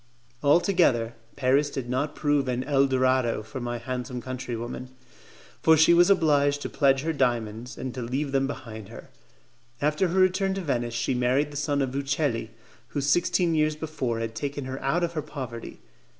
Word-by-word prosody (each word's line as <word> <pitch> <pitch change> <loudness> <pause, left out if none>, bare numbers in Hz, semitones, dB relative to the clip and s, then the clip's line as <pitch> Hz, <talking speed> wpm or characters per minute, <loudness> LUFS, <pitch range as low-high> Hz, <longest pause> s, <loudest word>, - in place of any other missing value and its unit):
Altogether, 145 - +3 0.2
Paris 140 +2 +2
did 135 -3 -5
not 135 +4 -1
prove 145 -3 +1
an 125 0 -1
'el 140 0 +3
dorado' 130 -3 +1
for 110 +5 -7
my 120 0 -3
handsome 125 +1 -4
countrywoman, 125 0 -5 0.7
for 160 0 +6
she 160 +3 +6
was 175 +2 +6
obliged 145 -6 +3
to - - -3
pledge 135 -2 +3
her 160 +2 -1
diamonds, 120 -3 -1
and 130 -1 -5
to 130 - -5
leave 135 +4 -2
them 135 0 +1
behind 110 -6 -7
her. 115 - -12 0.7
After 150 +5 +1
her 180 +2 0
return 190 +1 +2
to 195 - -3
Venice 120 -7 -2
she 125 +2 0
married 130 +4 +1
the - - -10
son 145 -1 0
of 130 - -2
the 135 - -2
Uccelli, 135 -5 -1 0.4
who 145 - -3
sixteen 170 +4 +2
years 155 -1 +2
before 150 -7 -3
had 115 0 -3
taken 140 +3 -4
her 130 +1 -5
out 150 +7 +1
of 170 0 -1
her 155 - -2
poverty. 125 -6 -7
135 Hz, 180 wpm, -26 LUFS, 125-150 Hz, 0.7 s, for